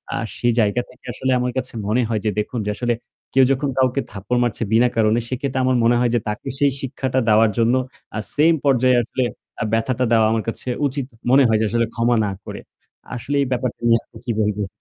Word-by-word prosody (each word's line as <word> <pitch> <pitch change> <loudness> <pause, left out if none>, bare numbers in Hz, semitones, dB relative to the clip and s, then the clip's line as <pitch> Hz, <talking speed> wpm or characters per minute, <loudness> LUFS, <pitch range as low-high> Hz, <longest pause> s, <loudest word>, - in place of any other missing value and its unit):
আর - - -2
সেই 120 -1 +1
জায়গা 110 +3 +2
থেকে 125 - -20
আসলে 130 +1 -1
আমার 125 0 -1
কাছে 130 -1 -3
মনে 120 +4 +2
হয় 110 -3 -1
যে - - +3
দেখুন, 115 +3 -3
যে - - -1
আসলে 120 -1 0 0.4
কেউ 135 0 +6
যখন 135 +1 0
কাউকে 130 +1 +2
থাপ্পড় 105 +5 -2
মারছে 115 -1 -1
বিনা 120 +2 +4
কারণে 110 +1 +3
সেক্ষেত্রে 130 0 -2
আমার 130 -1 +2
মনে 120 +1 +4
হয় 120 -1 +2
যে - - +3
তাকে 105 0 -4
সেই 140 -1 +3
শিক্ষাটা 130 0 -2
দেওয়ার 110 0 +5
জন্য 115 +1 +3 0.4
আ - - -1 0.2
same 160 +2 +4
পর্যায়ে 130 -2 +4
আসলে 125 +3 -2 0.4
আ - - +1
ব্যথাটা 120 +2 +1
দেওয়া 110 -1 +5
আমার 110 -1 0
কাছে 115 - -5 0.2
উচিত 135 -1 -3 0.3
মনে 135 +1 +6
হয় 110 -1 +3
যে - - +2
আসলে 115 0 +1
ক্ষমা 120 +1 +2
না 100 - -2
করে। - - -7 0.6
আসলে 130 +4 -3
এই 135 - 0
ব্যাপারটা 125 -1 -2
নিয়ে 115 0 +5
আপনি 115 - -16
কি 120 - -1
বলবেন? 105 -1 -1
120 Hz, 220 wpm, -21 LUFS, 115-130 Hz, 0.6 s, কেউ